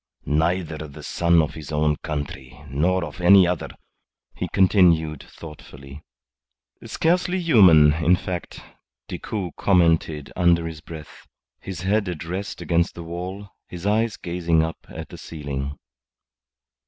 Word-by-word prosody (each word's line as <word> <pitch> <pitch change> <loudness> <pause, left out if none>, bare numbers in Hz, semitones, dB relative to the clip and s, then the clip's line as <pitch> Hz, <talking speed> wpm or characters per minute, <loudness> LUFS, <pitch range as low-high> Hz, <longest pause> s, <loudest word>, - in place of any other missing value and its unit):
"Neither 80 +1 0
the 70 - -12
son 85 -1 +2
of 80 - -4
his 75 -3 -9
own 75 0 +1
country 70 -3 -6
nor 85 +6 +1
of 75 +3 -9
any 95 +1 +7
other," 90 -2 -2 0.7
he - - -3
continued, 85 -6 +3
thoughtfully. 75 -3 -12 0.8
"Scarcely 180 +2 0
human, 95 - +6
in 85 +3 +3
fact," 90 -1 -6 0.5
Decoud 95 -5 -5
commented 80 -5 +1
under 85 -2 +3
his 80 -2 -7
breath, 80 -2 -11 0.3
his 95 -3 -7
head 100 +1 0
at 85 -3 -5
rest 95 +4 -5
against 85 0 0
the 85 - -7
wall, 90 +4 -6 0.2
his 90 +1 -9
eyes 110 +1 +1
gazing 85 -2 0
up 80 0 -6
at - - -8
the - - -11
ceiling. 70 -3 -5
85 Hz, 130 wpm, -23 LUFS, 75-95 Hz, 0.8 s, any